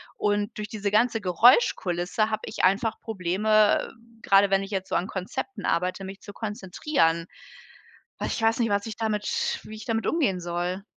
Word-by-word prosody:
Und, 205 0 -1
durch 210 0 -5
diese 210 -3 -2
ganze 225 +1 +2
Geräuschkulisse 190 - +3
habe 215 - -1
ich - - -5
einfach 200 +4 +2
Probleme, 210 +1 +1 0.3
grade 195 0 +5
wenn 195 0 +2
ich 195 - -8
jetzt 190 -1 -3
so - - -1
an 175 - +1
Konzepten 205 +5 -5
arbeite, 180 +3 0
mich 195 +1 -8
zu 205 - -10
konzentrieren. 195 - -1 0.9
Ach, - - -2
ich - - -3
weiß 225 0 +3
nicht, 230 - +1
was 200 +1 0
ich 220 - -6
damit 215 -2 -1
wie 220 - -9
ich 215 - -10
damit 225 -1 -1
umgehen 240 - +1
soll? 175 +2 -3
205 Hz, 175 wpm, -26 LUFS, 185-220 Hz, 0.9 s, grade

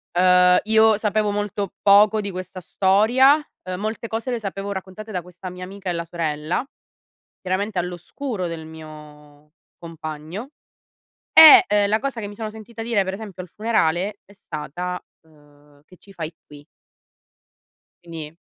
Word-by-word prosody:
Uhm, 180 0 +5
io 220 0 +4
sapevo 210 -1 0
molto 205 -1 -3
poco 210 +2 +5
di 200 - -4
questa 185 0 -7
storia. 220 - +4 0.3
Uhm, 185 0 -5
molte 220 +2 -4
cose 225 +2 -4
le 240 - -2
sapevo 195 -1 -5
raccontate 195 +3 -7
da 180 -3 -3
questa 180 +1 -9
mia 180 0 -9
amica 190 0 -7
e - - 0
la 170 0 -3
sorella; 165 +1 -2 0.8
chiaramente 190 +1 -2
all'oscuro 180 - -4
del 165 -1 -6
mio 150 -2 -13 0.3
compagno. 165 - -8 0.8
E 315 -5 +10
e 205 0 +2
la 215 +2 +1
cosa 275 -2 -4
che 205 - -4
mi 205 - -10
sono 220 0 -5
sentita 225 +1 -9
dire 225 -4 +1
per 190 0 -4
esempio 200 -4 -8
al 180 - -12
funerale 200 -2 0
è 200 - -19
stata, 180 0 -6 0.2
uhm: 145 -2 -24
"Che 185 - -19
ci 195 - -18
fai 165 -3 -5
qui?". 145 0 -15 1.4
Quindi, 165 -1 -8
185 Hz, 150 wpm, -22 LUFS, 165-210 Hz, 1.4 s, E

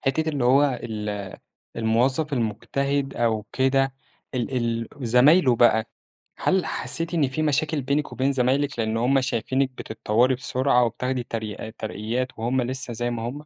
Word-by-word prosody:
حتّة 155 +4 0
اللي 145 -5 -1
هو 135 +1 +4
ال 105 -3 -5 0.4
الموظف 125 +7 +1
المجتهد 135 +4 -1
أو 110 -3 0
كده، 135 0 +2 0.4
ال 125 +1 -2
ال 115 -1 -1 0.2
زمايله 130 +2 +5
بقى، 110 -2 +4 0.5
هل 185 -3 +1
حسيتِ 165 +1 -3
إن 150 -6 +2
في 145 +4 -2
مشاكل 150 0 0
بينِك 140 +3 -1
وبين 135 +2 +1
زمايلِك 135 +1 +1
لأن 110 0 0
هُم 130 +4 +3
شايفينِك 130 +1 0
بتتطوّري 120 +1 0
بسرعة 125 0 +2
وبتاخدي 125 +2 -2
تريقا 110 -2 -5
ترقيات 110 +3 -3
وهُم 125 +3 0
لسّه 130 0 -3
زي 120 +1 -2
ما 115 -1 -4
هُم؟ 120 +2 -3
125 Hz, 145 wpm, -24 LUFS, 115-140 Hz, 0.5 s, زمايله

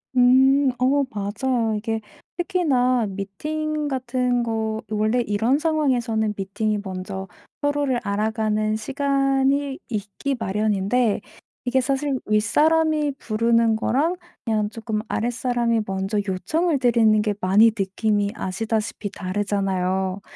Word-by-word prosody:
음. 265 +2 +5
어 275 +3 +3
맞아요. 225 +2 -1
이게 225 +1 -2 0.4
특히나 270 - +1
미팅 300 +11 -3
같은 250 -2 0
거 220 -1 -2
원래 215 +3 +1
이런 230 +5 +1
상황에서는 250 -9 +1
미팅이 205 +2 -1
먼저 190 0 -5 0.3
서로를 290 -3 +1
알아가는 215 +1 0
시간이 275 +2 0
있기 215 +5 -3
마련인데 210 +2 +1 0.5
이게 260 +1 +3
사실 270 +1 -1
윗사람이 300 +8 +2
부르는 230 0 +2
거랑 285 +10 +1 0.3
그냥 215 -2 0
쪼끔 220 -1 -4
아랫사람이 240 0 0
먼저 195 +2 -1
요청을 290 - 0
드리는 230 -4 +4
게 210 -1 0
많이 205 +5 +5
느낌이 205 +1 0
아시다시피 215 +2 -3
다르잖아요. 190 -1 -1
225 Hz, 270 characters per minute, -23 LUFS, 210-265 Hz, 0.5 s, 음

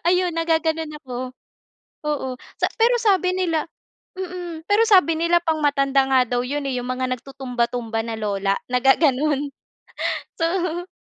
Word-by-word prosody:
Ayun 360 0 +2
naggaganon 320 -1 0
ako, 255 -1 -6 0.7
oo, 295 -3 -1 0.3
sa - - +4
pero 480 +2 +5
sabi 380 -4 +3
nila 330 -4 0 0.5
mm. 355 -3 -6
Pero 410 +2 +4
sabi 365 -6 +5
nila 340 +1 +3
pang 320 -2 0
matanda 275 -1 +3
nga 260 -1 +5
daw 245 0 0
'yun 285 +3 -3
eh, 255 - -1
'yung 245 - -6
mga 255 0 -1
nagtutumba-tumba 245 -3 -3
na 225 -1 -4
lola, 200 -2 0 0.2
na 250 - +3
gaganon, 285 +1 +3 0.9
so 350 +1 -1
300 Hz, 140 wpm, -22 LUFS, 255-345 Hz, 0.9 s, pero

